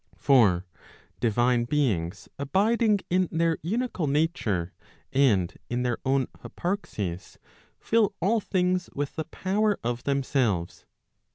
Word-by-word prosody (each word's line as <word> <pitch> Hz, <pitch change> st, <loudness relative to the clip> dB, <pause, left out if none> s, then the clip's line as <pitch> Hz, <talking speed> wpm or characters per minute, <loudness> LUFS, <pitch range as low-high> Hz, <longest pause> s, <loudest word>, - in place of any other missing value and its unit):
For 105 Hz, -10 st, +4 dB, 0.5 s
divine 120 Hz, +1 st, +2 dB
beings 100 Hz, -, -1 dB
abiding 205 Hz, -, +2 dB
in 185 Hz, 0 st, +3 dB
their 165 Hz, 0 st, +1 dB
unical 195 Hz, -, -2 dB
nature, 130 Hz, -, 0 dB, 0.4 s
and 110 Hz, -11 st, +3 dB
in 120 Hz, +1 st, -1 dB
their 120 Hz, -2 st, -1 dB
own 135 Hz, 0 st, +2 dB
hyparxis, 110 Hz, -, -4 dB, 0.4 s
fill 220 Hz, -3 st, +2 dB
all 210 Hz, +6 st, +2 dB
things 180 Hz, -2 st, 0 dB
with 145 Hz, 0 st, -3 dB
the 160 Hz, -, -3 dB
power 200 Hz, +5 st, 0 dB
of 120 Hz, +1 st, -3 dB
themselves. 130 Hz, -10 st, 0 dB
140 Hz, 110 wpm, -27 LUFS, 120-185 Hz, 0.5 s, For